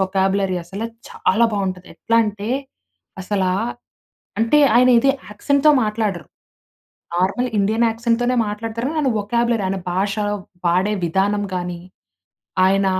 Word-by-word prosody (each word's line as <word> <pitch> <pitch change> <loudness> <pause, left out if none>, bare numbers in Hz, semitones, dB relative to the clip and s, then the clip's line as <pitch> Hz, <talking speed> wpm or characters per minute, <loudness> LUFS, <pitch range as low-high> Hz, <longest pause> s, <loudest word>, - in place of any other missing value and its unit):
Vocabulary 190 0 +1
అసలు 195 +6 -6 0.2
చాలా 220 +5 +1
బావుంటది. 185 -3 -3
ఎట్లా 230 - 0
అంటే, 210 +1 -4 0.7
అసలా 190 -1 0 0.9
అంటే 230 +6 +3 0.2
ఆయన 250 +1 +6
ఇది 275 +3 +4 0.2
యాక్సెంట్‌తో 280 +8 +2
మాట్లాడరు. 210 - -2 0.9
నార్మల్ 200 +8 +1
ఇండియన్ 215 +4 +2
యాక్సెంట్‌తోనే 235 +2 0
మాట్లాడతారు. 225 +3 -4
ఆయన 300 -3 +1
వొకబ్యూలరీ 235 +1 0
ఆయన 190 +1 -2
భాష, 195 +2 0 0.5
వాడే 185 +4 +2
విధానం 195 +4 +1
గానీ, 175 -1 -4 0.8
ఆయన 195 +1 +3
205 Hz, 110 wpm, -20 LUFS, 190-230 Hz, 0.9 s, ఆయన